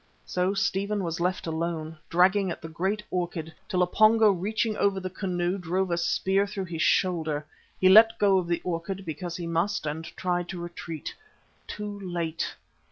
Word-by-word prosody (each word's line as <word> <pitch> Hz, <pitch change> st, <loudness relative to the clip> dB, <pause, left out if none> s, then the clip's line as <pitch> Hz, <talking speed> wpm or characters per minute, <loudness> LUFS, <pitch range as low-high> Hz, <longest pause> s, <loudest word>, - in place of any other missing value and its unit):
So 185 Hz, +2 st, 0 dB
Stephen 200 Hz, 0 st, 0 dB
was 170 Hz, -1 st, -3 dB
left 180 Hz, +2 st, -1 dB
alone, 160 Hz, -1 st, -3 dB
dragging 190 Hz, +3 st, +4 dB
at 170 Hz, -, -4 dB
the 165 Hz, -, -8 dB
great 190 Hz, +6 st, -2 dB
orchid, 170 Hz, -3 st, -3 dB, 0.2 s
till 180 Hz, -3 st, +2 dB
a -, -, +4 dB
Pongo 215 Hz, +3 st, +5 dB
reaching 215 Hz, +4 st, -1 dB
over 200 Hz, -1 st, +2 dB
the 185 Hz, -1 st, -5 dB
canoe 180 Hz, 0 st, -1 dB
drove 180 Hz, +1 st, -1 dB
a 170 Hz, -, +1 dB
spear 190 Hz, +3 st, +1 dB
through 200 Hz, -2 st, -4 dB
his 170 Hz, -2 st, -4 dB
shoulder. 160 Hz, -5 st, +1 dB, 0.3 s
He 185 Hz, -, +5 dB
let 225 Hz, +4 st, +8 dB
go 195 Hz, -3 st, +4 dB
of 175 Hz, -, -4 dB
the 170 Hz, 0 st, 0 dB
orchid 180 Hz, +2 st, -3 dB
because 175 Hz, +2 st, -5 dB
he 175 Hz, -, -5 dB
must 165 Hz, +2 st, 0 dB
and 155 Hz, +2 st, -3 dB
tried 175 Hz, -1 st, -1 dB
to 180 Hz, -, -5 dB
retreat. 170 Hz, -2 st, -6 dB, 0.5 s
Too 210 Hz, -1 st, -6 dB
late! 170 Hz, -4 st, -3 dB
180 Hz, 175 wpm, -27 LUFS, 170-195 Hz, 0.5 s, let